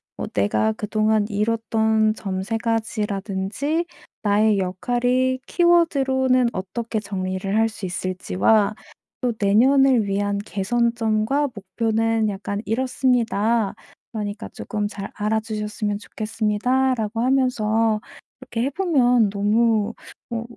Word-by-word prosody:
뭐 - - -4
내가 105 +2 +1
그동안 215 - +1
이뤘던 220 0 +1
점 190 -3 -4
3 225 +3 -2
가지라든지 220 - -2 0.4
나의 210 0 +3
역할이 245 +7 0
키워드로는 270 -8 +3
어떻게 220 +4 -3
정리를 195 -1 -3
할 225 0 +4
수 215 -2 -7
있을지와 185 - +1 0.5
또 245 -2 0
'내년을 250 +4 +4
위한 200 0 -1
개선점과 230 +5 0
목표는 225 +2 0
약간 200 0 -4
이렇습니다. 235 -3 +1 0.4
그러니까 210 0 -4
쪼끔잘 205 -2 -4
알아주셨으면 210 -1 -2
좋겠습니다.'라고 225 +2 -1
하면서 225 -4 +2 0.4
이렇게 245 -3 -4
해보면 260 - +2
너무 215 +1 +2 0.4
어 230 -1 -2
220 Hz, 260 characters per minute, -22 LUFS, 205-245 Hz, 0.5 s, 할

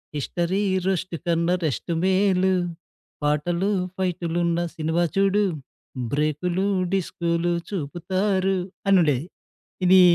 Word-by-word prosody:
History 175 +6 -1 0.2
roast 185 -2 -1
కన్నా, 170 +1 +2
rest 155 +3 -2
మేలు. 190 0 +3 0.7
పాటలు, 170 +7 +1 0.3
ఫైటులున్న 175 -2 0 0.2
సినిమా 160 +2 0
చూడు. 195 +1 +3 0.7
బ్రేకులు 155 +6 0 0.3
డిస్కూలు 170 -2 0 0.2
చూపుతారు 190 +3 0 0.3
అని 195 -1 +6
ఉండేది. 145 -3 +1 0.6
ఇదీ 185 +1 +7
175 Hz, 90 wpm, -24 LUFS, 165-190 Hz, 0.7 s, ఇదీ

